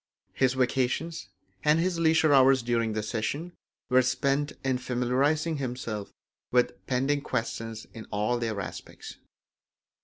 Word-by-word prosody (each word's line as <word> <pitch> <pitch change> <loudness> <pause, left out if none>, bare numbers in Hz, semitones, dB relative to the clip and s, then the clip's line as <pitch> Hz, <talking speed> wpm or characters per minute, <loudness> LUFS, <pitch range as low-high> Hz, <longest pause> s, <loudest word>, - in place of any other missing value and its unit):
His 130 -1 +2
vacations 130 +6 0 0.3
and 150 +1 +4
his 175 0 0
leisure 160 -2 +4
hours 130 -2 +6
during 115 -2 0
the 110 0 -2
session 140 +11 -3 0.3
were 130 0 +5
spent 140 +3 0
in 130 -1 0
familiarising 135 +6 +1
himself 120 -6 -4 0.4
with 125 0 +3
pending 135 +3 +1
questions 115 -2 -3
in 115 -2 -8
all 105 +4 0
their 110 -3 -2
aspects. 95 - -8
130 Hz, 125 wpm, -28 LUFS, 115-145 Hz, 0.4 s, hours